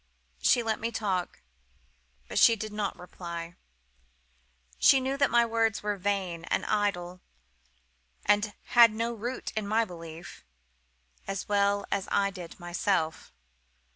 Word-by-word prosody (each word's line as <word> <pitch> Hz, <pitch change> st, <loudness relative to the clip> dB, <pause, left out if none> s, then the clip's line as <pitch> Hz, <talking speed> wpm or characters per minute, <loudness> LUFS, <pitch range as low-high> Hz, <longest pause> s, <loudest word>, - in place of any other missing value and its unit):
She 240 Hz, -, +4 dB
let 220 Hz, -1 st, -1 dB
me 230 Hz, +1 st, -2 dB
talk; 195 Hz, -, -2 dB, 0.8 s
but -, -, -1 dB
she 230 Hz, -, +7 dB
did 215 Hz, 0 st, -6 dB
not 210 Hz, -2 st, -2 dB
reply. 170 Hz, -1 st, -7 dB, 1.3 s
She 270 Hz, -, +6 dB
knew 265 Hz, +1 st, -1 dB
that 280 Hz, -1 st, +2 dB
my 235 Hz, 0 st, +4 dB
words 225 Hz, -2 st, 0 dB
were 210 Hz, 0 st, 0 dB
vain 190 Hz, -3 st, -2 dB
and -, -, -1 dB
idle, 185 Hz, -4 st, -1 dB, 1.0 s
and 205 Hz, +1 st, +2 dB, 0.2 s
had 235 Hz, -2 st, +8 dB
no 230 Hz, +1 st, -1 dB
root 240 Hz, +3 st, -5 dB
in 215 Hz, -2 st, -2 dB
my 225 Hz, +2 st, +2 dB
belief; 165 Hz, -3 st, -10 dB, 0.8 s
as 195 Hz, -1 st, -4 dB
well 200 Hz, 0 st, +2 dB
as 200 Hz, -1 st, -1 dB
I 200 Hz, 0 st, +2 dB
did 180 Hz, -3 st, -10 dB
myself. 175 Hz, -, -1 dB
205 Hz, 135 wpm, -28 LUFS, 180-225 Hz, 1.3 s, had